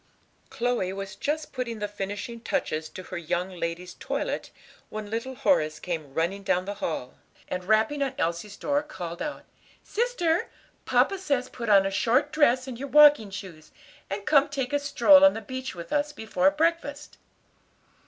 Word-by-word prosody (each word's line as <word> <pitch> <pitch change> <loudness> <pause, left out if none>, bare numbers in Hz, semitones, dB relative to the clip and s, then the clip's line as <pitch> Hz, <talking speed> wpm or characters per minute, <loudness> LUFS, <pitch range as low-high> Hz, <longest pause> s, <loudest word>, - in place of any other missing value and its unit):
Chloe 240 -6 -1
was 195 0 -6
just 300 +1 -3
putting 250 -4 -3
the 210 -1 -3
finishing 205 +3 -5
touches 155 -8 -2
to 185 - -9
her 175 - -6
young 175 +3 -2
lady's 175 0 -4
toilet - - -3 0.4
when 215 -1 -6
little 230 +4 -3
Horace 155 - +2
came 155 -6 -5
running 175 +5 0
down 185 -2 0
the 200 - -3
hall, 130 -6 -4 0.3
and 180 0 -4
rapping 220 +8 +2
on 275 -2 -1
Elsie's 170 +5 -2
door, 290 0 0
called 175 - -7
out, 300 0 -5 0.4
"Sister, 380 -8 0 0.4
papa 390 - +2
says 280 -8 -1
put 235 -2 -5
on 195 -2 +6
a 195 - -1
short 255 +9 +2
dress, 255 -4 +3
and 245 -2 -7
your 280 - -4
walking 295 -5 +7
shoes, 190 -6 -9 0.4
and 200 +1 -4
come 290 -2 +4
take 275 -1 -3
a 290 - +3
stroll 285 0 +6
on 290 - +7
the - - -3
beach 260 +1 -6
with 170 -1 -7
us 295 0 +1
before 270 +1 +1
breakfast." 300 -1 -1
230 Hz, 170 wpm, -27 LUFS, 190-285 Hz, 0.4 s, walking